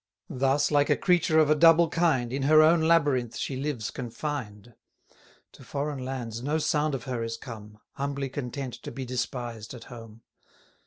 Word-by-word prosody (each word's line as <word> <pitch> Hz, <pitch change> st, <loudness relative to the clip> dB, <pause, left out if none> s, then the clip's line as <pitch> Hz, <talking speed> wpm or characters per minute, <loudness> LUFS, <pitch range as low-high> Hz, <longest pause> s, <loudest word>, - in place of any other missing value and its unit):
Thus, 135 Hz, +3 st, +1 dB
like 145 Hz, -1 st, +3 dB
a -, -, +3 dB
creature 170 Hz, -3 st, +2 dB
of 155 Hz, -1 st, +5 dB
a -, -, +5 dB
double 165 Hz, +2 st, +6 dB
kind, 140 Hz, -9 st, +1 dB
In 135 Hz, -, -2 dB
her 155 Hz, +3 st, +6 dB
own 165 Hz, +1 st, +5 dB
labyrinth 145 Hz, -8 st, +2 dB
she 135 Hz, -, -3 dB
lives 135 Hz, -5 st, -3 dB
confined. 120 Hz, -3 st, -6 dB, 0.8 s
To -, -, -15 dB
foreign 140 Hz, -2 st, -4 dB
lands 120 Hz, -3 st, -5 dB
no 145 Hz, +4 st, 0 dB
sound 150 Hz, -1 st, 0 dB
of 125 Hz, -, -6 dB
her 125 Hz, -2 st, -3 dB
is 115 Hz, 0 st, -4 dB
come, 105 Hz, -4 st, -10 dB
Humbly 140 Hz, -1 st, -3 dB
content 130 Hz, -1 st, -5 dB
to -, -, -7 dB
be 135 Hz, -1 st, -6 dB
despised 120 Hz, -2 st, -4 dB
at 115 Hz, -, -10 dB
home. 115 Hz, -1 st, -12 dB
135 Hz, 170 wpm, -27 LUFS, 120-150 Hz, 0.8 s, double